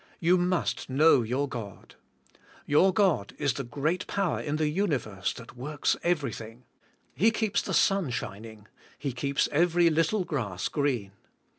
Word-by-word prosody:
You 175 +2 +4
must 180 -5 -1
know 140 +1 +5
your 125 +5 -1
God. 110 -7 -8 0.7
Your 170 +6 +4
God 185 - +1
is 145 -4 0
the 140 - -4
great 150 +9 -2
power 195 -4 -1
in 150 0 -2
the 155 0 +1
universe 140 - -1
that 115 -1 -12
works 145 +4 -1
everything. 125 - -2 0.5
He 215 +8 +4
keeps 220 -2 0
the - - -2
sun 195 -7 +3
shining. 110 -2 -6 0.3
He 140 - -3
keeps 140 +3 0
every 170 +2 +3
little 165 +6 +1
grass 105 - -3
green. 130 -9 -1
145 Hz, 145 wpm, -28 LUFS, 120-175 Hz, 0.7 s, know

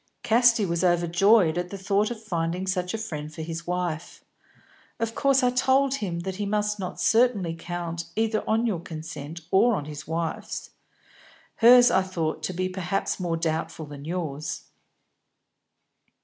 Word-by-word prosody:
"Casti 235 -2 +4
was 170 0 -1
overjoyed 175 +1 +4
at 180 0 -4
the 200 - -6
thought 200 +2 +1
of 240 -2 -5
finding 175 -2 -2
such 185 0 -1
a - - -1
friend 155 -9 -5
for 160 0 -7
his 165 +1 -6
wife. 175 -3 -3 0.7
Of 230 0 -2
course 275 +1 +3
I 250 - +4
told 265 +2 +3
him 185 -10 -3
that 190 +1 -5
he 205 -1 -2
must 210 0 0
not 185 -2 -5
certainly 225 -8 +3
count 170 0 -5
either 220 0 0
on 225 +2 +2
your 205 -7 0
consent 160 -1 -7
or 225 +4 +4
on 145 - -4
his 150 0 -8
wife's. 165 0 -4 0.9
Hers 245 +1 +7
I 190 - +4
thought 165 -4 -3
to 170 +4 -3
be 185 +1 -1
perhaps 185 +1 -2
more 170 -2 -1
doubtful 160 0 -2
than 145 -1 -10
yours." 155 -3 -4
180 Hz, 160 wpm, -26 LUFS, 165-215 Hz, 0.9 s, Hers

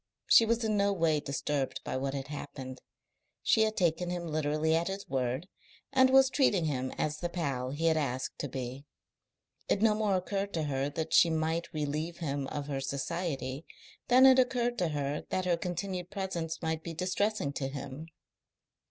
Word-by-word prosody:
She 225 - +7
was 230 +1 +1
in 215 -1 +1
no 200 0 +3
way 165 -4 +2
disturbed 140 -1 -2
by - - -4
what 135 +1 -2
had 135 0 -5
happened. 135 -3 -7 0.6
She 220 - +4
had 220 0 +1
taken 175 0 +1
him 175 -1 -3
literally 155 0 +1
at 165 +1 +1
his 195 +1 -5
word, 130 +4 -1 0.5
and 260 -1 +6
was 265 0 +6
treating 205 - +3
him 130 -4 -1
as 150 0 -1
the 175 - -2
pal 140 -8 -2
he 145 +5 -3
had 160 -1 +4
asked 130 -3 -2
to 145 - -2
be. 130 +2 -6 0.8
It 205 - +2
no 220 -1 +5
more 210 -2 +1
occurred 195 +2 -2
to 160 - 0
her 140 -1 -1
that 160 +2 -4
she 170 - +7
might 160 +1 -1
relieve 155 +3 -3
him 140 -4 -2
of 145 0 -4
her 140 -2 -3
society 140 0 -3 0.4
than 255 +2 +7
it 260 -1 +8
occurred 245 -2 +1
to 180 - +2
her 145 -1 -2
that 185 - -1
her 175 -1 +3
continued 180 +1 -4
presence 175 -5 -4
might 160 0 -1
be 165 0 -6
distressing 185 -2 0
to 135 -1 -2
him. 140 +2 -7
160 Hz, 185 wpm, -31 LUFS, 140-190 Hz, 0.8 s, it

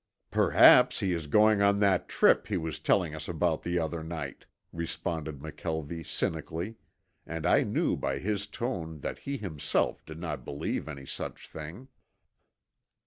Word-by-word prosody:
"Perhaps - - +6
he 95 - +1
is 85 -3 -3
going 105 +6 +5
on 100 0 +4
that 100 -3 +2
trip - - +4
he 100 - 0
was 80 -2 -4
telling 90 -6 +2
us 75 -1 -6
about 85 -1 0
the 85 +1 -1
other 80 -1 -2
night," 80 -5 -6 0.3
responded 80 -2 -3
McKelvie 80 +2 -5
cynically, 80 +7 -2 0.5
and - - -4
I - - +5
knew - - +1
by 70 - -2
his 100 +5 -2
tone 85 - -4
that - - -4
he 140 0 -4
himself 80 - -1
did 80 0 -9
not 75 -6 -4
believe 70 +4 -3
any 70 -3 -7
such - - -6
thing. 80 +12 -9
80 Hz, 150 wpm, -29 LUFS, 75-95 Hz, 0.5 s, Perhaps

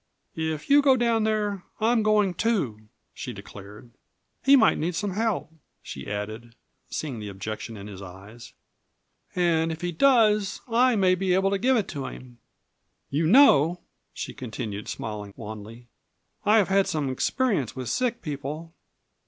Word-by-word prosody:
"If 160 -2 -3
you 285 +1 +6
go 270 -2 +5
down 230 -2 +2
there 210 -3 0 0.2
I 225 +2 +3
am 240 -2 +3
going, 210 -3 +3
too!" 155 - -1 0.3
she - - -6
declared. 105 +4 -12 0.5
"He 275 +1 +7
might 225 -5 +4
need 170 +2 -1
some 205 +2 -2
help," 205 -5 -1 0.3
she 65 - -8
added, 110 +3 -5 0.3
seeing 135 -7 -4
the 105 -1 -6
objection 110 +3 -6
in 100 - -9
his 100 -2 -9
eyes, 100 +5 -12 0.8
"and 165 -2 +2
if 160 - -6
he 175 0 -2
does 215 - +3
I 245 +1 +3
may 190 -3 +4
be 185 0 +1
able 195 +1 +2
to 200 - 0
give 260 +4 +3
it 210 - 0
to 140 -4 -4
him. 125 -1 -11 0.7
You 155 +3 +1
know," 175 - +6 0.3
she - - -6
continued, 110 -4 -6
smiling 105 -2 -6
wanly, 110 +2 -9 0.6
"I 215 +2 +6
have 205 -4 +3
had 195 0 +3
some 150 -3 -1
experience 190 - 0
with 130 -2 -5
sick 240 - -1
people." 150 +2 -5
165 Hz, 160 wpm, -26 LUFS, -, 0.8 s, He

